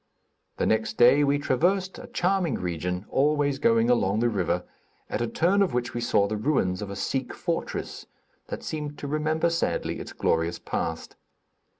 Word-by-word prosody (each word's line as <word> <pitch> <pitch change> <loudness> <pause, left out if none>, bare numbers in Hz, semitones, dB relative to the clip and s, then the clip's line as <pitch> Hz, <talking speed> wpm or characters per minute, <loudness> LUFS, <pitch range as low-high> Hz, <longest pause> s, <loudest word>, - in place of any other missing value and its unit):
The - - 0
next 110 0 0
day 125 +4 +6
we 140 0 +3
traversed 180 +8 0
a 250 - -9
charming 185 - 0
region, 90 +2 -3
always 145 0 +2
going 115 -4 +3
along 110 -4 +2
the 120 +1 +2
river 90 -4 0 0.5
at - - -1
a 120 - 0
turn 175 - +2
of 190 -10 +1
which 125 0 -1
we 120 - -3
saw 100 -3 +3
the 110 - -2
ruins 105 -9 +1
of 105 - -5
a 100 - -5
Sikh 130 +6 -2
fortress, - - -4 0.4
that - - -6
seemed 150 -2 -4
to 145 - -6
remember 155 +3 +1
sadly 170 - -1
its - - -7
glorious 80 +1 0
past. 80 -1 -4
130 Hz, 175 wpm, -26 LUFS, 105-155 Hz, 0.5 s, day